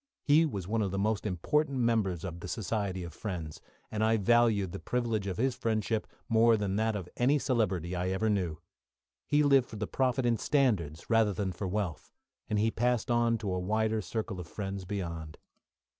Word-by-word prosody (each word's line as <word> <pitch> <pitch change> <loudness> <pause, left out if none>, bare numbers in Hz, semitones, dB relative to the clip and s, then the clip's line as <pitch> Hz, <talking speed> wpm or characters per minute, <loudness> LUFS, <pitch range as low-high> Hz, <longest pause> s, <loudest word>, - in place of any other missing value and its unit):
He 155 +3 +5
was 100 - -5
one 110 +2 0
of 100 - 0
the 95 - -3
most 105 +1 0
important 140 - 0
members 110 -8 +1
of 85 -2 -5
the 90 - -7
Society 100 -3 -2
of 85 -2 -7
Friends, 85 -6 -5 0.3
and 110 0 -1
I 110 +1 +3
valued 110 -3 +3
the 95 - -6
privilege 115 -5 -1
of 95 -2 -3
his 130 +2 +1
friendship 110 -2 -1 0.2
more 115 0 +5
than 100 -2 -1
that 110 0 +1
of 95 -4 -4
any 135 +4 +3
celebrity 95 - 0
I 90 +1 -1
ever 95 +4 0
knew. 90 -7 0 0.7
He 150 0 +3
lived 135 -3 +4
for - - -8
the 105 0 -2
profit 130 0 0
in 120 -1 +3
standards 105 - +1
rather 115 -3 +3
than 95 0 -2
for 95 +2 -4
wealth, 95 -4 -3 0.4
and 105 - +1
he 110 +2 +2
passed 120 0 0
on 120 -1 +3
to 100 -4 -3
a 90 - -1
wider 110 +3 0
circle 105 0 -4
of 90 - -7
friends 95 +1 -5
beyond. 85 -5 -5
105 Hz, 195 wpm, -30 LUFS, 95-115 Hz, 0.7 s, He